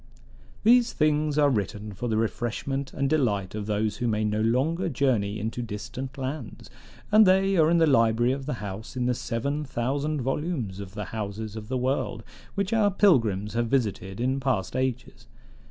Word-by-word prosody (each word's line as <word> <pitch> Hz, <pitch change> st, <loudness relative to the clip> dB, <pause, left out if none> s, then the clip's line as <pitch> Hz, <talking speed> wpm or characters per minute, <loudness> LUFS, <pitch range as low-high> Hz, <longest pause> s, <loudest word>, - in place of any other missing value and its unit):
"These 240 Hz, +2 st, +5 dB
things 150 Hz, -1 st, +1 dB
are 145 Hz, -1 st, +4 dB
written 105 Hz, -1 st, -3 dB
for 120 Hz, +6 st, -4 dB
the 110 Hz, -2 st, 0 dB
refreshment 120 Hz, +4 st, -2 dB
and 140 Hz, 0 st, -1 dB
delight 110 Hz, -11 st, 0 dB
of 105 Hz, -1 st, -4 dB
those 105 Hz, 0 st, 0 dB
who 120 Hz, -, -1 dB
may 110 Hz, -1 st, 0 dB
no 105 Hz, 0 st, 0 dB
longer 150 Hz, +11 st, +1 dB
journey 115 Hz, -7 st, 0 dB
into 115 Hz, +3 st, -3 dB
distant 120 Hz, +5 st, -6 dB
lands; 130 Hz, -3 st, -6 dB, 0.4 s
and 215 Hz, +1 st, +8 dB
they 195 Hz, +1 st, +4 dB
are 160 Hz, -3 st, +4 dB
in 170 Hz, -, +4 dB
the 165 Hz, -, +5 dB
library 120 Hz, -3 st, +3 dB
of 135 Hz, +1 st, -4 dB
the 150 Hz, -, -1 dB
house 100 Hz, +5 st, -7 dB
in 125 Hz, -, 0 dB
the 125 Hz, -, +2 dB
seven 135 Hz, +5 st, -2 dB
thousand 140 Hz, +3 st, -2 dB
volumes 135 Hz, -, -2 dB
of 100 Hz, 0 st, -8 dB
the 105 Hz, -1 st, -4 dB
Houses 110 Hz, 0 st, -4 dB
of 110 Hz, -1 st, -7 dB
the 130 Hz, +2 st, -1 dB
World 125 Hz, -4 st, -1 dB, 0.3 s
which 200 Hz, +1 st, -1 dB
our 215 Hz, -2 st, +4 dB
pilgrims 115 Hz, -, +2 dB
have 120 Hz, 0 st, 0 dB
visited 105 Hz, -6 st, -1 dB
in 130 Hz, +3 st, 0 dB
past 125 Hz, -8 st, -1 dB
ages. 125 Hz, -1 st, -3 dB
125 Hz, 180 wpm, -26 LUFS, 110-145 Hz, 0.4 s, and